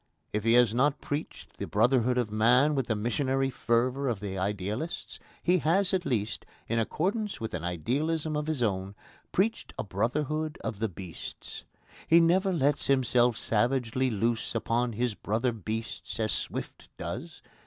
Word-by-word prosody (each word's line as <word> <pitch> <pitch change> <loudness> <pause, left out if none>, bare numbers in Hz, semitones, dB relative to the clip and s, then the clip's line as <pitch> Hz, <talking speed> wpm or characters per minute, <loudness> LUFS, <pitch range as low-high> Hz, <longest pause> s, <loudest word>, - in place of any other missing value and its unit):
If 105 0 0
he 115 - +5
has 120 -3 +5
not 140 +4 +2
preached 145 +2 -5
the - - -3
brotherhood 125 +3 +3
of 120 -4 0
man 125 +7 +4
with 135 -4 0
the 110 - +1
missionary 135 +5 0
fervour 125 +4 +1
of 115 -5 -1
the 100 -2 -4
idealists, 100 - -3 0.2
he 180 +1 +4
has 185 +5 +2
at 180 -2 0
least, 110 -3 -1 0.2
in 115 +1 +1
accordance 195 - -1
with 110 - -4
an 90 -2 -3
idealism 145 - -1
of 150 0 -2
his 155 -6 0
own, 100 -2 -1 0.4
preached 220 +5 0
a - - -2
brotherhood 150 +10 -1
of 105 - -3
the 110 0 0
beasts. 90 -2 -9 0.4
He 165 - +7
never 185 +4 +4
lets 145 -4 +1
himself 125 -3 +3
savagely 125 +2 +1
loose 115 +1 -1
upon 120 +1 0
his 120 +1 0
brother 115 +5 0
beasts 110 +2 -5
as 110 -1 +1
Swift - - -4
does. - - -6
120 Hz, 160 wpm, -29 LUFS, 110-150 Hz, 0.4 s, He